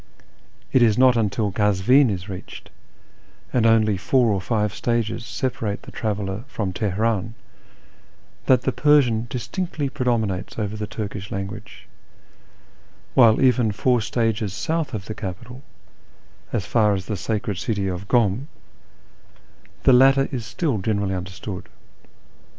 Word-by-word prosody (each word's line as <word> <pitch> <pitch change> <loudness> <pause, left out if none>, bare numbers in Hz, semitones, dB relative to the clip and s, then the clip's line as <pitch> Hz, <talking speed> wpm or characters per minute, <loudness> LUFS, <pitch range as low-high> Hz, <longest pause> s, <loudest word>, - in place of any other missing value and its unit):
It 130 - +5
is 110 -3 +4
not 130 0 +6 0.2
till 105 -1 -1
Kazvin 105 +7 +3
is 95 -2 -4
reached, 95 -2 -9 0.8
and 115 -3 +3
only 110 -3 +3
four 120 +4 +2
or 95 - -1
five 105 -1 -1
stages 115 -1 -1
separate 115 -3 -3
the - - -11
traveller 105 -1 -3
from 100 -8 -3
Teheran, 110 +2 -1 1.1
that 130 -2 +4
the - - +1
Persian 125 -7 +3
distinctly 145 - -3
predominates 110 -8 -1
over 105 -1 -3
the 105 -1 -4
Turkish 100 -2 -6
language; 95 0 -7 1.3
while 115 -4 +6
even 125 -4 +3
four 120 +3 +1
stages 110 -3 -1
south 160 +1 -2
of 95 -3 -6
the 110 - -5
capital, 110 +7 -7 0.9
as 105 -7 -1
far 105 0 +2
as 95 -1 -5
the 105 - -3
sacred 100 0 -3
city 100 -4 -1
of 95 +1 -4
Kum, 120 +2 +1 1.4
the 130 - +6
latter 135 +2 +5
is 120 -5 -4
still 130 - -1
generally 100 -1 -1
imderstood. 95 +1 -6
110 Hz, 130 wpm, -22 LUFS, 100-125 Hz, 1.4 s, not